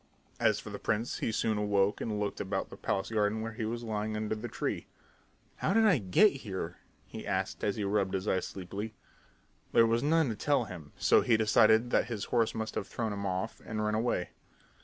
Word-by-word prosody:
As - - +3
for - - -8
the - - -6
prince, 110 +3 -1
he - - 0
soon 110 -1 0
awoke 100 -1 +1
and 105 -2 -2
looked 105 -1 -2
about - - -3
the - - -7
palace 95 +3 -2
garden 110 0 +1
where 115 0 -3
he 115 0 -4
was 120 +2 -3
lying 110 -1 -2
under 110 0 -1
the 110 +2 -4
tree. 110 - -3 0.7
"How 195 - 0
did 225 0 +5
I 180 -10 +5
get 115 - +5
here?" 95 -8 -5 0.3
he - - -8
asked - - -2
as 100 - +1
he 105 - -2
rubbed 100 -1 +1
his 95 +2 -3
eyes 95 - +1
sleepily. 100 +4 -6 0.8
There 115 - +7
was 115 +1 +2
none 160 -1 +3
to 110 - -2
tell 140 +2 +2
him, 85 -9 -9
so - - +5
he 115 -2 +3
decided 110 +2 +4
that - - +3
his 110 -4 -3
horse 115 -2 +2
must 110 -1 -3
have - - -3
thrown 110 -3 -3
him 100 -1 -3
off 95 +4 -3
and 110 -1 -3
run 105 - 0
away. 110 -5 0
110 Hz, 215 wpm, -31 LUFS, 100-115 Hz, 0.8 s, There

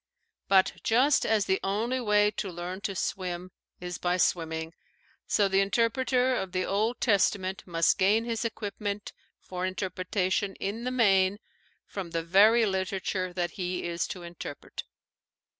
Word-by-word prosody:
But 190 -1 +4
just 260 +6 +3
as 215 -3 +2
the 190 - +1
only 225 +6 -1
way 210 -2 +3
to 195 -1 -4
learn 175 +2 -6
to 200 -1 -3
swim 180 0 -3 0.3
is 180 -1 -5
by 180 0 +1
swimming, 160 -2 0 0.5
so 205 -2 +3
the 195 0 +2
interpreter 250 +5 +2
of 190 -5 -3
the 185 0 0
Old 215 +5 0
Testament 195 -3 +1
must 165 -4 +2
gain 210 +4 +3
his 230 -1 -2
equipment 205 -2 -4 0.3
for 180 -1 -6
interpretation 185 +1 -1
in 220 +5 -4
the - - 0
main 195 -5 +3 0.5
from 190 -4 -6
the 165 0 -2
very 210 +7 +5
literature 190 -1 -2
that 175 -1 -1
he 180 -1 -3
is 170 0 -2
to 180 - -7
interpret. 170 -4 -8
195 Hz, 145 wpm, -28 LUFS, 180-210 Hz, 0.5 s, very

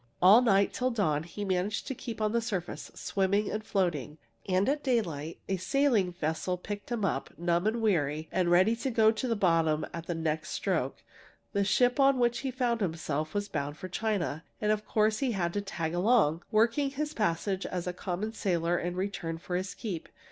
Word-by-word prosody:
"All 195 +6 +8
night, 200 -5 +3
till 255 0 0
dawn, 190 -11 +1
he 175 +5 -6
managed 190 +2 -1
to - - -3
keep 230 -2 -7
on 215 -1 +2
the 235 +1 +1
surface, 185 -9 -4
swimming 200 +1 0
and 215 - -3
floating. 170 - -1 0.3
And 185 +1 +2
at 290 +2 +1
daylight 170 - -1
a 190 - 0
sailing 215 -1 +2
vessel 175 +2 -2
picked 205 +4 -7
him 225 -4 0
up, - - -1
numb 175 +3 +1
and 225 +1 0
weary, 155 -6 +1
and 180 -2 +1
ready 185 +6 +5
to 255 +3 -2
go 220 -2 +5
to 240 +3 -3
the 230 - +1
bottom 165 -5 +2
at 165 0 -6
the 175 - -2
next 160 -1 -2
stroke. - - -1 0.5
The 200 -1 +2
ship 245 +6 +3
on 275 -1 +5
which 240 -1 +2
he 270 - -2
found 245 -3 0
himself 155 -3 -2
was 205 0 -1
bound 145 -3 -3
for 185 - -6
China, 185 -7 -1 0.2
and 210 0 +1
of 215 0 -1
course 215 0 +2
he 260 -4 0
had 170 -3 -1
to 205 - -1
'tag 165 -5 -3
along,' 175 -4 +3
working 235 +6 +3
his 300 +2 -3
passage 190 - -1
as 180 -2 -3
a 180 - -2
common 190 +5 -3
sailor 175 -5 0
in 175 0 -3
return 180 -4 -3
for 180 +2 -5
his 185 +1 -3
keep. 185 -8 -5
195 Hz, 200 wpm, -30 LUFS, 170-225 Hz, 0.5 s, All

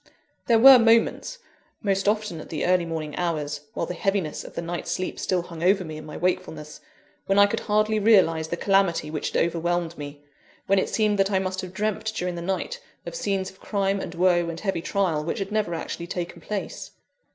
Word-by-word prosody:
There 230 - +5
were 260 +2 +10
moments 230 - +2 0.5
most 195 -1 0
often 210 -5 0
at - - -12
the 155 - -2
early 180 -1 +3
morning 155 -2 -4
hours, 150 -4 -2
while - - -1
the - - -5
heaviness 195 -5 -1
of - - -12
the 170 - -2
night's 175 +1 -4
sleep 185 - -3
still 180 -2 0
hung 170 -2 -9
over 190 +2 +3
me 155 -2 -7
in 155 0 -9
my - - -7
wakefulness 175 -4 -3 0.5
when 195 - +2
I 200 - +8
could 215 +3 -1
hardly 215 +1 +1
realise 185 -7 +4
the 170 - -3
calamity 195 -6 +2
which 155 - -2
had - - 0
overwhelmed 170 0 -1
me; 145 0 -8 0.4
when 195 0 +3
it - - -1
seemed 210 -2 +1
that 195 0 +3
I 195 - +2
must 185 0 -2
have 185 - -7
dreamt, 215 +2 -2
during 180 -3 -2
the 170 - -5
night, 190 - -3 0.2
of - - -6
scenes 195 - -2
of 190 - -23
crime 195 -1 -1
and 180 -2 -6
woe 175 -1 +3
and 165 0 -5
heavy 195 -5 -2
trial 175 -5 0
which 165 - -3
had 195 0 -4
never 210 -6 0
actually 170 +1 -5
taken 175 -1 -5
place. 205 +3 -5
185 Hz, 210 wpm, -25 LUFS, 170-200 Hz, 0.5 s, were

